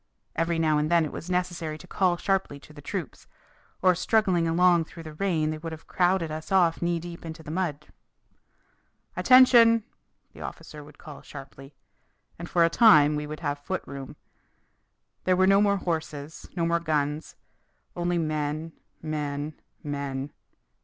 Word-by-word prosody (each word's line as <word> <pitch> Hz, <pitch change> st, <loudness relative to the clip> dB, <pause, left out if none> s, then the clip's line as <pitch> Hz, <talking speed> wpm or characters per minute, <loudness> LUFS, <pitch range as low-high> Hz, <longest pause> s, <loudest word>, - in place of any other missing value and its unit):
Every 165 Hz, 0 st, 0 dB
now 155 Hz, -2 st, +2 dB
and 150 Hz, +1 st, 0 dB
then 170 Hz, -2 st, +4 dB
it 150 Hz, -, -6 dB
was 170 Hz, -, -8 dB
necessary 175 Hz, -3 st, -2 dB
to 180 Hz, -, -13 dB
call 180 Hz, -1 st, +1 dB
sharply 195 Hz, -7 st, -1 dB
to 150 Hz, -, -16 dB
the 145 Hz, -, -12 dB
troops, 175 Hz, +1 st, -6 dB, 0.6 s
or 185 Hz, -1 st, +6 dB
struggling 180 Hz, -2 st, +1 dB
along 170 Hz, 0 st, +4 dB
through 165 Hz, +1 st, -11 dB
the 155 Hz, -1 st, -9 dB
rain 155 Hz, -3 st, 0 dB
they 155 Hz, -, -5 dB
would 165 Hz, +1 st, -6 dB
have 160 Hz, 0 st, -9 dB
crowded 180 Hz, -3 st, +1 dB
us 155 Hz, +3 st, -7 dB
off 175 Hz, -4 st, +3 dB
knee 170 Hz, 0 st, 0 dB
deep 170 Hz, 0 st, -9 dB
into 160 Hz, -1 st, -8 dB
the 150 Hz, -, -7 dB
mud. 160 Hz, -4 st, -2 dB, 1.3 s
"Attention!" 240 Hz, -3 st, +6 dB, 0.5 s
the -, -, -12 dB
officer 150 Hz, -1 st, -8 dB
would 145 Hz, 0 st, -16 dB
call 150 Hz, -4 st, -11 dB
sharply. 135 Hz, 0 st, -12 dB, 0.6 s
And 170 Hz, -, -7 dB
for 170 Hz, -1 st, +4 dB
a -, -, +4 dB
time 155 Hz, -10 st, +6 dB
we 150 Hz, 0 st, -3 dB
would 155 Hz, +2 st, -7 dB
have 145 Hz, -2 st, -2 dB
foot 185 Hz, +6 st, -4 dB
room. 140 Hz, -2 st, -8 dB, 1.1 s
There 185 Hz, -, +3 dB
were 185 Hz, -, +4 dB
no 195 Hz, +1 st, +5 dB
more 200 Hz, -1 st, +3 dB
horses, 160 Hz, -4 st, -5 dB
no 170 Hz, -2 st, 0 dB
more 170 Hz, 0 st, +1 dB
guns 150 Hz, -2 st, -2 dB, 0.6 s
only 175 Hz, 0 st, -1 dB
men, 155 Hz, 0 st, -2 dB, 0.3 s
men, 150 Hz, -1 st, -3 dB, 0.3 s
men. 140 Hz, -1 st, -4 dB
165 Hz, 165 wpm, -26 LUFS, 150-180 Hz, 1.3 s, or